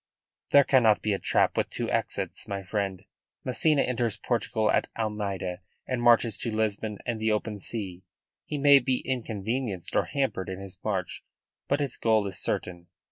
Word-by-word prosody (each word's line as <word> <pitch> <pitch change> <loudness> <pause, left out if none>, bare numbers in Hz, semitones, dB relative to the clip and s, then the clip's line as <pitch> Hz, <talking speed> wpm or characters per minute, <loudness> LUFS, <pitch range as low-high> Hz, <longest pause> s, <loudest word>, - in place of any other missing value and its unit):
"There 140 - +7
cannot 120 -6 +4
be 105 - +1
a 95 - -1
trap - - +2
with - - 0
two - - -3
exits, - - -2
my 100 -1 -4
friend. 95 -1 -3 0.4
Massena 140 +3 +3
enters 120 -4 0
Portugal 110 -2 0
at - - +2
Almeida 100 -5 -2 0.3
and 130 -2 -2
marches 120 -2 +4
to 120 - -1
Lisbon 110 -1 -1
and 120 -3 -2
the 110 0 +2
open 105 0 -2
sea. 95 -4 -5 0.4
He 150 - -4
may 140 0 +7
be 130 0 0
inconvenienced 115 -4 -3
or - - +3
hampered 135 -10 -2
in 95 0 -5
his 95 -2 -9
march; 95 -4 -2 0.4
but 140 +1 +1
its 140 -3 -2
goal 110 -2 +2
is 95 -1 -4
certain. 85 -1 -2
110 Hz, 170 wpm, -27 LUFS, 100-125 Hz, 0.4 s, There